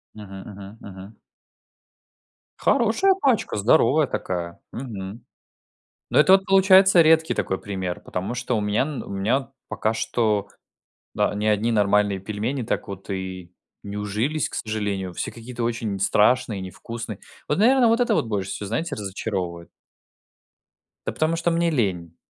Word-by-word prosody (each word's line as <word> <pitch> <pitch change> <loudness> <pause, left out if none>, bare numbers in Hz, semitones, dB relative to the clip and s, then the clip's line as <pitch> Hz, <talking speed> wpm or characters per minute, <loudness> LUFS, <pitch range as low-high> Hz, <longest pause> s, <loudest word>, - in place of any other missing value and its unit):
Мгм, 100 -2 -9
мгм. 100 +2 -11
Мгм. 95 +2 -11 1.4
Хорошая 250 - +3
пачка, 255 - +1
здоровая 125 +7 +4
такая. 85 -7 -4
Мгм. 110 -4 -7 0.9
Но - - +3
это 150 +5 +6
вот 190 0 +6
получается 190 -1 +6
редкий 160 0 +4
такой 95 - -1
пример, 95 -3 -4
потому 95 +6 -4
что 125 0 -1
у - - 0
меня 105 +2 +1
н 145 -1 -4
у - - -11
меня 115 +8 0 0.2
пока 110 - -1
что, 110 -2 0 0.7
да, - - +1
ни 105 +1 -2
одни 110 +2 +2
нормальные 105 -2 +2
пельмени 110 +7 -3
так - - -3
вот 100 0 -8
и 95 -2 -5 0.3
не 100 0 -7
ужились, 110 +9 -1
к - - -11
сожалению. 100 -4 -3
Все - - -3
какие-то 120 +1 -7
очень 115 -4 -2
страшные 105 +1 +2
и - - -6
невкусные. 110 +3 -7 0.3
Вот, 150 - 0
наверно, 245 +3 +5
вот 230 +2 +3
это 240 -3 +2
вот 125 - +1
больше 100 -3 -2
всего, 105 - -5
знаете, 125 +11 -2
разочаровывает. 95 -4 -4 1.4
Да - - 0
потому 155 +1 0
что 170 +1 0
мне 170 0 +2
лень. 95 - -1
110 Hz, 150 wpm, -23 LUFS, 100-140 Hz, 1.4 s, это